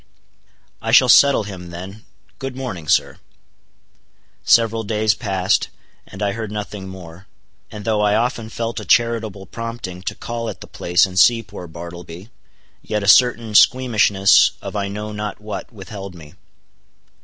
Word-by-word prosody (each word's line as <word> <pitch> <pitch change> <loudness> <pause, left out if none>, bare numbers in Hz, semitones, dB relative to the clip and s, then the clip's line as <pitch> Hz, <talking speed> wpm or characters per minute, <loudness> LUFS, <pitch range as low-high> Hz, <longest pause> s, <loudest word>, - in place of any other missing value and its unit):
"I - - -2
shall - - +6
settle 140 -5 +6
him 95 -4 -9
then,—good 100 +8 -10
morning, 115 -12 -6
sir." - - +1 1.2
Several 115 -1 +3
days 110 0 +1
passed, 95 -5 0 0.4
and 95 +2 -7
I 100 - +1
heard 110 0 -5
nothing 105 -2 -6
more; 90 0 -12 0.4
and 105 -1 -9
though 110 -2 +1
I 105 0 +2
often 115 0 -1
felt 115 0 -4
a - - -7
charitable 115 -5 +1
prompting 115 -6 -7
to 100 - -4
call 115 -1 -5
at - - -9
the - - -8
place 90 +2 +1
and 95 -1 -2
see 115 +4 +5
poor 100 -4 -10
Bartleby, 85 +4 -10 0.5
yet 105 -1 -3
a - - -3
certain 115 0 +4
squeamishness 105 -5 +4
of - - -8
I 100 -1 -1
know 105 +2 -6
not 105 -1 -5
what 105 +3 -7
withheld 100 -3 -9
me. 75 -3 -13
105 Hz, 150 wpm, -20 LUFS, 95-115 Hz, 1.2 s, shall